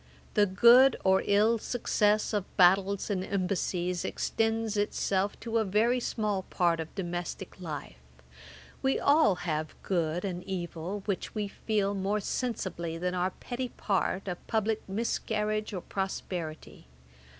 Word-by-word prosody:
The 205 -1 +4
good 240 +7 +7
or 190 0 +4
ill 215 +3 +4
success 215 -2 +1
of 205 -3 -3
battles 195 +3 +4
and 185 -2 -1
embassies 180 -2 -1
extends 225 -1 -1
itself 205 -1 0
to 230 -1 0
a - - +2
very 220 +5 +2
small 210 -5 -1
part 170 -2 +1
of 160 0 -6
domestick 175 0 -5
life: 150 - -6 0.8
we 265 0 +1
all 280 - +4
have 155 -2 -2
good 170 -1 0
and 180 -2 -4
evil, 185 +1 -4
which 200 +1 -3
we 210 -1 -1
feel 205 -1 -1
more 200 +2 0
sensibly 190 -8 -3
than 180 +1 -2
our 180 0 +1
petty 245 +6 -5
part 195 -2 -1
of 180 -1 -3
publick 220 0 0
miscarriage 215 0 -1
or 185 -3 -4
prosperity. 175 - -5
195 Hz, 135 wpm, -29 LUFS, 180-215 Hz, 0.8 s, good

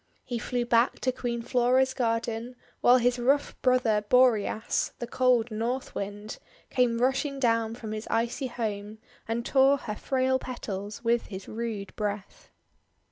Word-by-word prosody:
He 240 -2 -3
flew 245 +1 -2
back 235 +1 +3
to 255 - +1
Queen 240 -2 -3
Flora's 255 +2 +2
garden; 230 0 -2 0.2
while 245 +1 +6
his 245 0 +1
rough 275 +4 +1
brother 250 -5 +2
Boreas, 235 -4 +2
the 240 - -4
cold 245 -1 +2
North 235 +4 -3
Wind, 205 +2 -6 0.3
came 245 -2 +2
rushing 270 +3 0
down 230 -3 +1
from 225 -3 -7
his 215 +1 -5
icy 235 +3 0
home, 215 -3 -4 0.3
and 230 +1 -2
tore 270 +1 +4
her 220 -5 -5
frail 260 +2 0
petals 210 -4 -6
with 235 0 +1
his 190 -1 -8
rude 220 -3 -5
breath. 205 -2 -5
235 Hz, 145 wpm, -28 LUFS, 220-255 Hz, 0.3 s, while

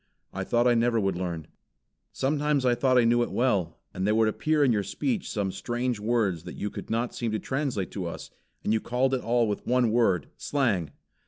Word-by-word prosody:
I - - -3
thought 120 0 +1
I 125 - +5
never 115 0 +2
would 95 -3 0
learn. 85 -3 -4 0.7
Sometimes 145 0 0
I 125 - +4
thought 130 +1 +2
I 125 - +6
knew 120 +1 +3
it 120 - -1
well; 100 -10 0 0.2
and 95 +2 -2
there 105 - +3
would 110 0 +4
appear 155 +6 +1
in 135 - +4
your 105 -3 +2
speech 225 - -2
some 100 -3 -1
strange 120 +3 -2
words 105 -6 0
that - - -7
you 105 - -4
could - - -8
not 115 +2 -1
seem 115 -2 -2
to 110 - 0
translate 130 -8 -2
to 95 -4 -4
us, 85 - -7 0.3
and 105 - +1
you 110 - +2
called 130 +2 0
it 130 - 0
all 120 0 +2
with 105 - -4
one 125 -2 +3
word, 105 - +2
'Slang!' 110 - 0
120 Hz, 220 wpm, -27 LUFS, 100-125 Hz, 0.7 s, I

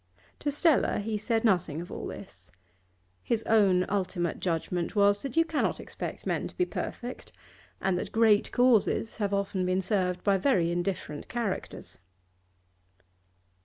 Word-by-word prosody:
To 295 - -1
Stella 295 +1 +3
he 215 +1 -2
said 225 +2 0
nothing 175 -8 +1
of 175 - -8
all - - -5
this. 90 - -11 0.7
His 225 - -1
own 195 -5 +4
ultimate 185 -3 -1
judgment 175 +2 -2
was 205 0 +4
that 275 0 -5
you 330 - +5
cannot 320 -2 -1
expect - - -7
men - - -1
to - - -15
be 360 - +2
perfect, 250 -7 -6 0.5
and 185 -2 0
that - - -5
great 220 -2 +3
causes 240 -2 +2
have 205 -3 -1
often 200 -1 -1
been 185 +1 +1
served 180 -3 0
by 200 -2 +3
very 180 -8 +2
indifferent 175 -4 -3
characters. 230 -5 -4
200 Hz, 145 wpm, -28 LUFS, 180-225 Hz, 0.7 s, you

